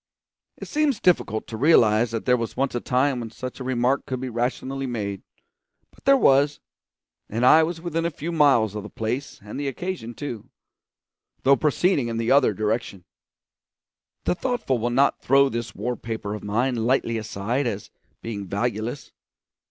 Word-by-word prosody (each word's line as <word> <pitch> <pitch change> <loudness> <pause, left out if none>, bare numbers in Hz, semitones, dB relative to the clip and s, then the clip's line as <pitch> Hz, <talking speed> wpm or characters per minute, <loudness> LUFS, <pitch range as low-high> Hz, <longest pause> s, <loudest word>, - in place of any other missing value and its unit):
It - - -8
seems 295 -6 +1
difficult 110 - +1
to 115 - -7
realise 115 -5 +4
that 115 0 -4
there 125 - +4
was 115 -2 -4
once 135 +1 0
a 120 - -1
time 130 +2 +1
when 115 -1 -5
such 125 +4 -7
a - - -5
remark 130 +1 0
could 130 -1 -3
be 130 0 -4
rationally 130 +3 -2
made; 100 -5 -4 0.7
but - - -23
there 275 0 +6
was, 145 - +4 0.7
and 115 +4 0
I 155 +5 +8
was 165 +1 -2
within 165 -1 -2
a 170 - +1
few 165 +1 -5
miles 140 - +4
of 105 - -4
the 105 - -9
place 120 +5 -4
and 105 +6 -7
the 145 - -2
occasion 135 -4 -5
too, 120 -8 -6 0.9
though 140 +1 +6
proceeding 150 -1 +1
in 115 -1 -3
the 115 +1 0
other 140 -4 +5
direction. 105 -3 -2 1.2
The - - +1
thoughtful 185 - -1
will 120 +2 0
not 135 +4 +2
throw 140 +1 +4
this 115 -2 -5
war 125 0 -2
paper 110 -2 -5
of 105 - -6
mine 120 +5 0
lightly 115 0 +1
aside 110 +5 -2
as 105 -3 -5 0.3
being 100 -4 -5
valueless. 115 +5 -3
125 Hz, 175 wpm, -24 LUFS, 110-140 Hz, 1.2 s, I